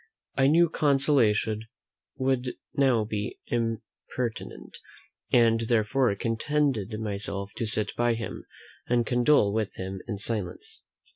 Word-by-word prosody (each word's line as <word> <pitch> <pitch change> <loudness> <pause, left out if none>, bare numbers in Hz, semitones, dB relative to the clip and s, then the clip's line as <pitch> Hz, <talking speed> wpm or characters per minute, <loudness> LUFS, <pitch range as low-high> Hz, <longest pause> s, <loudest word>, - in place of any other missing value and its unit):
I 135 0 +4
knew 170 +4 +5
consolation 130 -8 +2 0.5
would 130 -1 0 0.2
now 130 -5 +3
be 105 -1 -4
impertinent; 115 +1 -4 0.5
and, 115 -2 +4
therefore, 115 +1 +1
contented 115 -1 -1
myself 100 -2 -3
to 115 - -1
sit 105 0 +2
by 120 -1 +2
him, 115 0 -6 0.4
and 120 -1 +2
condole 120 -3 +3
with 110 -2 -2
him 95 0 -5
in 110 -4 -3
silence. 115 - -5
115 Hz, 115 wpm, -27 LUFS, 105-130 Hz, 0.5 s, knew